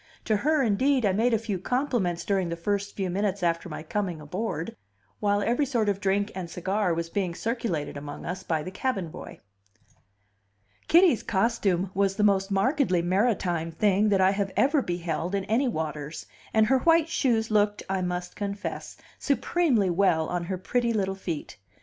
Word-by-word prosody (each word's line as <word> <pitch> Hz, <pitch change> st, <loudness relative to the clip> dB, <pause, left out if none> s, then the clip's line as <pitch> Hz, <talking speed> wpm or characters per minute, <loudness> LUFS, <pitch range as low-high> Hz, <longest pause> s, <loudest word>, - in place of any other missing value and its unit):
To 215 Hz, -2 st, +2 dB
her, 300 Hz, +5 st, +2 dB
indeed, 255 Hz, +3 st, +2 dB
I 200 Hz, -, +3 dB
made 225 Hz, +6 st, +2 dB
a 225 Hz, -, +3 dB
few 210 Hz, -4 st, -3 dB
compliments 240 Hz, -7 st, -1 dB
during 190 Hz, -3 st, 0 dB
the 170 Hz, -, -2 dB
first 200 Hz, +3 st, -2 dB
few 190 Hz, -3 st, -2 dB
minutes 200 Hz, 0 st, -1 dB
after 170 Hz, +1 st, 0 dB
my 155 Hz, -, -6 dB
coming 180 Hz, -1 st, -2 dB
aboard, 170 Hz, +1 st, -4 dB, 0.4 s
while 205 Hz, 0 st, +1 dB
every 245 Hz, +6 st, +1 dB
sort 230 Hz, -5 st, +1 dB
of 200 Hz, -1 st, -1 dB
drink 200 Hz, +2 st, 0 dB
and 180 Hz, -3 st, -5 dB
cigar 190 Hz, +3 st, -1 dB
was 165 Hz, 0 st, -1 dB
being 180 Hz, -1 st, -2 dB
circulated 210 Hz, -, -2 dB
among 145 Hz, 0 st, -7 dB
us 180 Hz, +2 st, -4 dB
by 160 Hz, -4 st, -1 dB
the 185 Hz, -, -6 dB
cabin 200 Hz, -4 st, -2 dB
boy. -, -, -10 dB, 1.5 s
Kitty's 340 Hz, -, +5 dB
costume 195 Hz, -3 st, 0 dB
was 195 Hz, 0 st, +1 dB
the 210 Hz, -, 0 dB
most 195 Hz, -1 st, +3 dB
markedly 195 Hz, -, +2 dB
maritime 180 Hz, -4 st, 0 dB
thing 205 Hz, +4 st, +2 dB
that 195 Hz, -2 st, +3 dB
I 190 Hz, 0 st, +5 dB
have 200 Hz, -1 st, -1 dB
ever 285 Hz, +2 st, +3 dB
beheld 175 Hz, -1 st, -2 dB
in 195 Hz, -1 st, -1 dB
any 240 Hz, +6 st, +1 dB
waters, 155 Hz, -, -4 dB, 0.3 s
and 220 Hz, -1 st, +4 dB
her 265 Hz, +4 st, +3 dB
white 330 Hz, +2 st, +4 dB
shoes 230 Hz, -8 st, +1 dB
looked 205 Hz, -1 st, +2 dB
(I 190 Hz, -1 st, -1 dB
must 180 Hz, 0 st, -3 dB
confess) 200 Hz, 0 st, -5 dB, 0.2 s
supremely 280 Hz, -, +1 dB
well 170 Hz, -3 st, +2 dB
on 175 Hz, -1 st, -2 dB
her 185 Hz, +1 st, -3 dB
pretty 235 Hz, +5 st, 0 dB
little 195 Hz, -3 st, 0 dB
feet. 170 Hz, -, -6 dB
200 Hz, 175 wpm, -27 LUFS, 175-225 Hz, 1.5 s, Kitty's